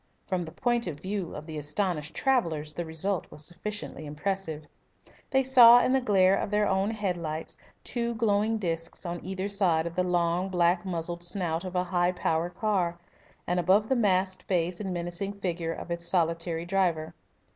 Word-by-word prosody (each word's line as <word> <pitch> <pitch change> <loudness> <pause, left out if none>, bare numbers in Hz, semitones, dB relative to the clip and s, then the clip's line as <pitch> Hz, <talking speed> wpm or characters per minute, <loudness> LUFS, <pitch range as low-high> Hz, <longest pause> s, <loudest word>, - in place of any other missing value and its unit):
From 180 -3 -2
the 160 - -9
point 240 +3 0
of 150 -4 -5
view 190 -1 -4
of 150 - -7
the 155 -2 -5
astonished 150 0 -2
travellers 165 - 0
the 175 - -4
result 165 +3 -1
was 150 - -6
sufficiently 175 -3 -5
impressive. 155 0 -3 0.6
They 265 0 +3
saw 245 -2 +8
in - - +2
the 265 - +3
glare 195 -5 +4
of - - -2
their 210 0 +2
own 195 +1 +1
head 205 -5 -2
lights 160 -1 -5 0.3
two 235 -1 -2
glowing 220 0 +1
discs 165 -3 -3
on 175 0 -4
either 190 +1 -3
side 185 -6 +2
of 170 - -4
the 180 - +1
long, 175 +1 +1
black 175 0 +2
muzzled 175 -1 -3
snout 175 -2 0
of 185 -1 -6
a 180 - +2
high 180 0 +1
power 165 -1 0
car, 180 -3 -1 0.5
and 180 +1 0
above 195 +5 +3
the 265 - +3
masked 190 -4 +1
face 175 -1 0
and 195 -3 -3
menacing 175 +3 -3
figure 175 -4 -3
of 170 - -7
its 170 0 -2
solitary 165 -1 0
driver. 175 -4 0
180 Hz, 180 wpm, -28 LUFS, 170-200 Hz, 0.6 s, saw